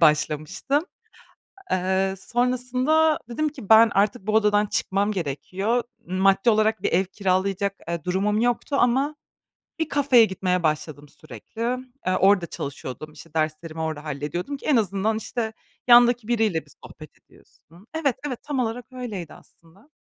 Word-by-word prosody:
başlamıştım. 155 - +1 0.9
Eee, 190 +1 +1
sonrasında 255 +7 +1
dedim 305 +6 -1
ki, 265 -9 -12
"Ben, 225 +1 +8
artık 200 0 +1
bu - - +1
odadan 210 -1 +3
çıkmam 200 0 0
gerekiyor." 195 - -2 0.2
Maddi 195 +4 +3
olarak 215 0 +2
bir - - -1
ev 185 +3 +3
kiralayacak, 195 +1 -1
eee, 170 -2 -3
durumum 205 +4 0
yoktu 245 +4 0
ama 270 +5 +2 0.6
bir 320 -1 -1
kafeye 270 -5 +5
gitmeye 185 -2 -1
başladım 150 -2 -2
sürekli. 190 +10 -10 0.4
Eee, 185 - +2
orada 190 -2 +4
çalışıyordum, 145 0 -7
işte, 160 0 -15
derslerimi 155 +1 -2
orada 155 -2 -3
hallediyordum, 155 - -4
ki - - -11
en 295 - +4
azından, 210 0 0
işte, 220 0 -3 0.3
yandaki 240 -2 +6
biriyle 220 -9 +1
bir - - -17
sohbet - - -13
ediyorsun. 175 +6 -22
Evet, 290 -6 0
evet, 255 -5 -5
tam 290 -3 -3
olarak 240 0 -2
öyleydi, 220 -10 -6
aslında. 185 - -21
205 Hz, 140 wpm, -24 LUFS, 175-245 Hz, 0.9 s, Ben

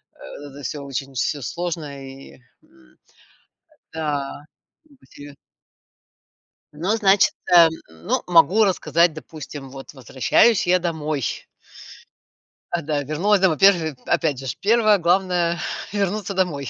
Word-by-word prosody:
Это 145 -1 -11
всё 140 +3 -5
очень 135 0 -6
всё 140 +3 -2
сложно, 155 -3 -5
и 135 0 -13 0.2
м, 320 0 -25 1.0
да, 145 -3 -4 0.4
грубо 285 -4 -24
себе 145 0 -13 1.4
Но, 180 +9 -1
значит, 200 -2 +4 0.2
эм, 170 -1 +8 0.2
ну, 80 0 -3
могу 180 +5 +5
рассказать, 170 -2 +2
допустим, 150 -3 -10
вот 135 +2 -11
возвращаюсь 140 - +2
я 180 +1 +4
домой 155 -4 -3 1.5
А, 175 -1 -1
да, 145 -1 -2
вернулась 175 +9 +1
домой. 185 -4 +3
Во-первых, 170 -6 +3
опять 160 -6 0
же 135 - -8
ж, 120 - -3
1-е 215 0 +3
главное- 175 -1 +1 0.3
вернуться 200 0 -2
домой. 170 -8 -2
165 Hz, 120 wpm, -21 LUFS, 145-190 Hz, 1.5 s, эм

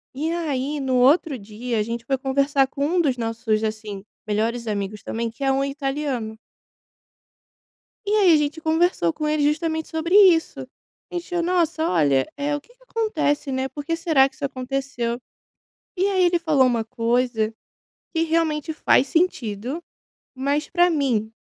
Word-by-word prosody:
E 310 +4 -1
aí, 295 -4 -2
no 265 -2 0
outro 275 +3 +4
dia, 220 +3 -5
a - - +2
gente 230 +1 -5
foi 270 0 0
conversar 275 +1 +2
com 280 +1 -2
um 345 +4 +2
dos 270 -6 +1
nossos, 225 -1 -1
assim, 215 -2 -4 0.2
melhores 225 +3 -1
amigos, 205 0 -3
também, 230 0 -3
que 230 +5 -8
é 270 - +3
um 270 +1 +1
italiano. 275 -5 -3 1.7
E 405 - -1
aí, 390 -5 +6
a - - +7
gente 295 +2 -1
conversou 320 - +2
com 305 - -3
ele 300 -1 +1
justamente 315 +1 0
sobre 335 +3 +1
isso. 365 -6 +5 0.5
A - - -11
gente 350 0 -4
falou: 350 -1 0
"Nossa, 335 -2 +1
olha, 140 -6 +2
eh, 290 +1 -1
o - - -6
que 480 +11 -24
que - - -30
acontece, 340 - -1
né? 260 0 -1
Porque 295 +4 -3
será 315 -5 +3
que - - -26
isso - - -7
aconteceu?" 255 -2 -3 0.8
E 370 +2 +2
aí, 380 -2 +2
ele 350 0 +3
falou 310 -5 +3
uma 235 -2 +1
coisa 230 -1 0 0.6
que 325 - +2
realmente 320 -1 0
faz 275 -3 +3
sentido. 265 - -1 0.5
Mas, 280 +3 -1
para 350 0 +4
mim 255 -9 0
275 Hz, 170 wpm, -23 LUFS, 235-320 Hz, 1.7 s, a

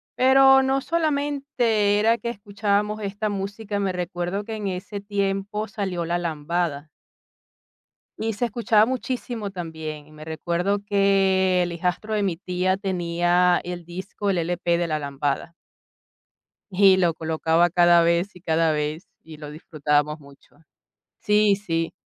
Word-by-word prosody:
Pero 270 +1 +6
no 265 +1 +1
solamente 280 -9 0
era 225 +2 +3
que 235 - -4
escuchábamos 205 0 -1
esta 205 +1 -3
música, 205 +1 -4
me 195 -1 0
recuerdo 180 +2 -3
que 225 - -5
en 210 -2 -4
ese 195 +2 -5
tiempo 200 +1 -2
salió 190 -5 -3
la 170 +1 0
lambada 160 -2 -2 1.3
y 225 0 -1
se 240 +4 -1
escuchaba 225 -1 +3
muchísimo 245 -3 -3
también. 160 -4 -7
Me 155 0 -11
recuerdo 170 +5 -1
que 195 -2 +3
el 175 - -3
hijastro 180 +5 -2
de 210 - +1
mi 185 -4 -1
tía 185 +1 -1
tenía 175 -1 +1
el 175 -1 -6
disco, 185 +4 -5
el 190 - +1
LP 170 0 0
de 170 0 -1
la 155 -1 -1
lambada 140 +2 -3 1.2
y 190 0 +5
lo 175 -3 +2
colocaba 160 +2 +1
cada 175 0 +5
vez 170 +4 +1
y 180 - -14
cada 165 -1 +2
vez 150 +2 -3 0.2
y 160 -1 -12
lo 150 -1 -9
disfrutábamos 150 -1 -1
mucho. 140 0 -19 0.6
Sí, 210 -1 +3
sí, 165 -5 -3
185 Hz, 140 wpm, -24 LUFS, 170-210 Hz, 1.3 s, Pero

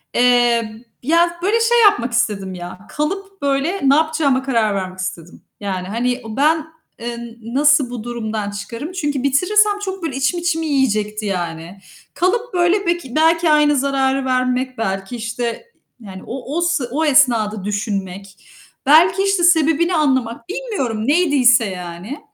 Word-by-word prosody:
Eee, 240 -2 +2 0.2
ya, 340 +4 +2
böyle 420 +5 +2
şey 475 +1 +3
yapmak 245 - +3
istedim 205 -5 -1
ya, 175 0 -8
kalıp, 390 +6 -4
böyle, 280 +7 -1
ne 275 - +6
yapacağıma 310 -4 +1
karar 230 -6 +1
vermek 185 -1 -5
istedim. 180 -2 -6 0.2
Yani, 190 -3 -4
hani, 245 +4 -2
o 220 -1 -7
ben, 310 +2 +2 0.3
eee, 235 0 -5
n 235 -1 -9 0.2
nasıl 290 -2 +4
bu 245 -3 -6
durumdan 220 -3 -4
çıkarım? 230 - -7
Çünkü 290 -7 -2
bitirirsem 410 +9 +2
çok, 380 -2 -5
böyle, 295 -5 -3
içim 270 +6 0
içimi 330 -1 -1
yiyecekti 215 -7 0
yani. 175 -1 -4 0.3
Kalıp, 465 +7 -1
böyle, 360 +3 +2
beki 345 -8 -2
belki 325 +1 +3
aynı 300 -1 +4
zararı 270 0 0
vermek, 255 0 -1
belki, 195 +1 -3
işte, 235 - -4 0.3
yani, 190 -4 -10
o 270 +4 -5
o - - +1
s 345 -4 0
o 310 +5 0
esnada 235 -8 +3
düşünmek, 195 -2 -5 0.4
belki 345 +7 +5
işte 390 -2 +1
sebebini 335 0 +3
anlamak. 260 -2 0
Bilmiyorum 365 - -3
neydiyse 280 -7 +4
yani. 180 - -7
260 Hz, 150 wpm, -19 LUFS, 220-325 Hz, 0.4 s, ne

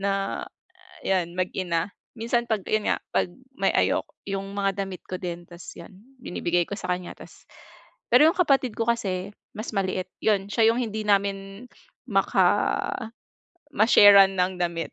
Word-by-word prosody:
na 195 0 -1 0.6
yan, 180 -3 0
mag-ina. 180 -1 -1 0.2
Minsan 235 +1 -1
pag 215 -4 0
yun 215 -1 0
nga - - +1
pag - - +1 0.3
may - - +1
ayok - - +1 0.2
yung 195 0 -4
mga 195 0 -1
damit 190 -2 -9
ko 185 - -4
din 175 -1 -5
tas 175 0 -11
'yon - - -11 0.3
binibigay 175 0 0
ko 200 - -4
sa 185 - -3
kanya. 180 0 -8
Tas - - -15 0.6
pero 245 +5 +6
yung 330 - +2
kapatid 275 -8 +2
ko 230 - -1
kasi, 200 -4 -1 0.2
mas 215 +3 -6
maliit. 185 -1 -1 0.2
'Yon 200 -3 +2
siya 225 0 +4
yung 235 - -2
hindi 220 -2 -3
namin 200 +2 -1 0.4
maka - - +2 1.3
ma-share-an 200 -3 +7
ng 180 +1 +2
damit. 170 -1 -2
195 Hz, 155 wpm, -25 LUFS, 185-220 Hz, 1.3 s, ma-share-an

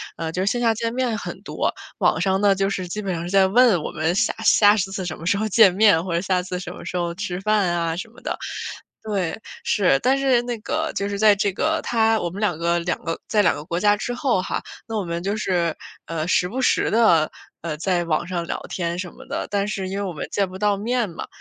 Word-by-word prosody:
呃， 160 -1 -4
就 180 - -2
是 - - +3
线 240 +1 -1
下 230 -1 +3
见 230 +1 -3
面 245 -3 0
很 - - -7
多， - - -2 0.2
网 160 - +2
上 190 0 +2
呢， 200 -1 +4
就 195 0 0
是 185 -2 -3
基 210 +4 -4
本 195 -3 -2
上 170 0 -4
是 175 - -5
在 195 -1 +4
问 220 -5 +4
我 - - -4
们 160 +3 -1
下 235 +4 +2
下 205 0 +6
次 190 -1 -2
什 165 - -4
么 165 - -9
时 200 +3 +2
候 215 +1 -1
见 200 -3 +6
面， 190 -4 +4
或 180 - -3
者 170 - +1
下 185 -2 +1
次 180 0 -5
什 175 - -6
么 - - -10
时 180 - -5
候 175 -1 -1
吃 185 0 -4
饭 210 -3 +2
啊， 170 -1 0
什 225 +5 -5
么 230 - -18
的。 - - -3 0.7
对， 195 -5 -2 0.2
是， 180 -10 +3
但 265 +2 +2
是 265 -3 +3
那 240 -1 -4
个 315 +6 -2
就 200 - -1
是 200 0 -4
在 215 -2 +6
这 200 0 0
个 320 +9 0
他 225 -1 +2
我 - - -2
们 195 - -7
两 180 -7 +1
个 170 +1 +1
两 175 0 -1
个 165 - -2
在 210 -2 +3
两 - - +4
个 145 - -7
国 170 +3 -3
家 205 +1 +4
之 245 +3 -4
后 245 -8 +1
哈， - - -3 0.2
那 225 -1 -3
我 200 - -1
们 170 0 -3
就 200 +3 -2
是， 175 -5 0 0.3
呃， 160 0 -3
时 180 0 +2
不 260 - -4
时 255 - +2
地， 195 -9 +4 0.3
呃， 155 -2 -4
在 175 +1 0
网 165 +1 0
上 175 -2 -3
聊 - - -3
天 170 -1 -3
什 180 -2 -5
么 - - -14
的， - - -3
但 200 0 0
是 195 -3 -3
因 195 - -3
为 - - -2
我 185 - -3
们 155 - -5
见 195 -2 0
不 185 - -8
到 205 0 +2
面 230 +2 -1
嘛。 165 - -7
195 Hz, 285 characters per minute, -22 LUFS, 175-215 Hz, 0.7 s, 下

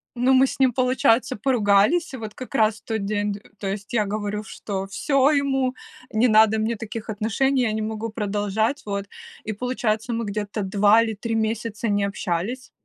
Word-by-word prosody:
Ну, 250 +2 +3
мы 260 +1 +6
с 270 - -5
ним, 260 -3 +4
получается, 255 -1 +2
поругались, 225 - +2
и - - -4
вот 220 -1 -7
как 255 +1 -9
раз 220 -4 +3
в - - -38
тот 220 -3 -2
день 205 0 -1
д 200 - -9 0.2
то 195 - -4
есть 200 +3 -5
я 215 -3 +2
говорю: 210 +1 -3
"Что 195 -2 -5
всё, 275 +8 +2
ему 270 -3 +1 0.4
не 225 +3 +3
надо 220 0 +5
мне 225 +2 0
таких 220 +1 -7
отношений, 240 +6 +1
я 220 - +1
не 220 - -2
могу 220 +1 -3
продолжать", 210 +4 -1
вот. 200 -1 -3 0.4
И 215 - -3
получается, 235 -1 -2
мы 230 -1 -2
где-то 205 +1 -3
2 205 +3 +4
или 225 -1 -1
3 225 +2 -4
месяца 220 0 -2
не 205 0 +1
общались. 200 +5 -3
220 Hz, 190 wpm, -23 LUFS, 205-250 Hz, 0.4 s, мы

